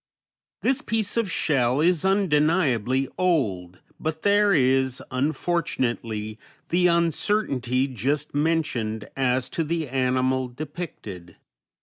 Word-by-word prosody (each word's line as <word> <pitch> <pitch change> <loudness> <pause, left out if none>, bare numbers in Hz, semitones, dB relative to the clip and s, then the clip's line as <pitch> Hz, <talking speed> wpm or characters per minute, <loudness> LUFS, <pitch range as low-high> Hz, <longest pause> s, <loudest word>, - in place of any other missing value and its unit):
This 265 +2 +2
piece 220 -7 -1
of 230 -4 0
shell 130 -5 +1
is 170 0 +3
undeniably 150 - +2
old, 100 - 0 0.2
but 160 0 -4
there 205 0 +4
is, 130 -4 +2
unfortunately, 125 -7 -2 0.3
the 180 +1 +3
uncertainty 165 - +1
just 140 +4 -2
mentioned 140 -9 -1
as 130 -1 +1
to 165 - -2
the 160 0 -2
animal 130 0 0
depicted. 125 - -8
140 Hz, 100 wpm, -24 LUFS, 125-170 Hz, 0.3 s, there